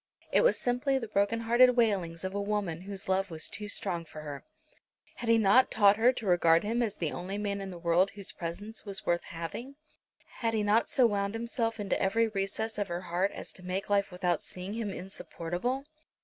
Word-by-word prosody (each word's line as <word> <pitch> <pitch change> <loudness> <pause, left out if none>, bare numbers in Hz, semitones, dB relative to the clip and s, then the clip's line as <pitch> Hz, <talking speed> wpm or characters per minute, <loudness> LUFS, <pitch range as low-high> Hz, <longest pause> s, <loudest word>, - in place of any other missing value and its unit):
It - - +5
was - - +4
simply 255 +3 +1
the 235 -4 -4
broken 210 +2 +1
hearted 245 +2 +5
wailings 190 -8 +1
of 190 0 -3
a 200 - -1
woman 200 -5 -2
whose 195 0 -7
love 190 +1 +1
was 160 -2 -2
too 210 0 -4
strong 180 -4 0
for 155 -1 -10
her. 145 -2 -7 0.7
Had 235 - -4
he 230 - +6
not 220 +4 +5
taught 205 -1 +5
her 235 +3 +5
to 245 -3 -6
regard 170 -3 +4
him 230 +3 0
as 215 -4 -1
the 160 -6 -2
only 190 +3 -4
man 200 -1 -2
in 195 - -5
the 180 - -7
world 170 +3 +3
whose 200 -2 -6
presence 205 +6 -6
was 200 0 -5
worth 175 0 +1
having? 170 +11 -6 0.6
Had 230 -2 0
he 215 - +1
not 210 +3 +3
so 255 - +4
wound 200 -1 0
himself 230 -1 -2
into 205 -1 -1
every 225 +4 +2
recess 210 +1 -3
of 205 - -1
her 175 0 -3
heart 180 +2 0
as - - -6
to - - -12
make 185 +2 -3
life 200 -1 +2
without 180 -1 0
seeing 185 +2 -7
him 225 -2 -3
insupportable? 190 +6 -4
200 Hz, 210 wpm, -30 LUFS, 180-225 Hz, 0.7 s, he